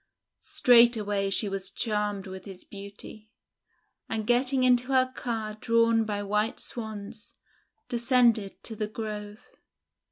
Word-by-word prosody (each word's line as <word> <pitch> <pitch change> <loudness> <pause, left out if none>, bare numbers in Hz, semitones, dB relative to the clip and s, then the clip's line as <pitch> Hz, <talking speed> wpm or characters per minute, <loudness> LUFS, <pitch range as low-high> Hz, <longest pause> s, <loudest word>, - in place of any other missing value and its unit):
Straightway 220 -5 +4
she 200 +2 +1
was 195 -1 -4
charmed 210 -1 -2
with 190 -1 -9
his 190 -2 -10
beauty, 200 +2 -10 0.8
and, 220 -1 -2
getting 255 +3 +2
into 250 0 +4
her 260 -1 +2
car 225 -3 -3
drawn 230 +1 +2
by 205 -1 -3
white 210 +2 -1
Swans, 220 -1 -7 0.5
descended 235 -4 +2
to 225 - -6
the 215 0 -2
Grove. 210 0 -7
215 Hz, 120 wpm, -27 LUFS, 205-235 Hz, 0.8 s, Straightway